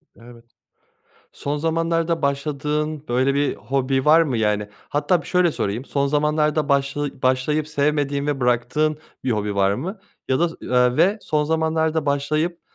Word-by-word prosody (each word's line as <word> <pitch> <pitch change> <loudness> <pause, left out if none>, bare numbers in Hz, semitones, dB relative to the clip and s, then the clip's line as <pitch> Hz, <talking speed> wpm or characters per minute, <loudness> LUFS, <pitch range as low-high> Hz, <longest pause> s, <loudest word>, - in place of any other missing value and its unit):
Evet. 115 0 -15 0.9
Son 145 +1 -3
zamanlarda 165 +1 0
başladığın 150 +2 -2
böyle 130 +3 +2
bir 145 0 +1
hobi 130 +2 -1
var 160 +2 +6
mı 140 -7 -1
yani? 105 -1 0 0.2
Hatta 150 +4 +1
bir - - -13
şöyle 180 -3 +2
sorayım 105 +6 -3
son 140 -1 0
zamanlarda 150 0 +1
başla 140 0 -1
başlayıp 140 +4 +1
sevmediğin 145 -1 0
ve 145 -2 -1
bıraktığın 125 +6 +1 0.3
bir 130 - 0
hobi 105 -1 -2
var 100 0 +2
mı 185 - -5 0.3
ya 130 - +2
da, 170 0 +2
eee, 125 0 +2
ve 200 +4 +3
son 150 -1 0
zamanlarda 160 -1 0
başlayıp 155 +5 0
145 Hz, 150 wpm, -22 LUFS, 130-155 Hz, 0.9 s, var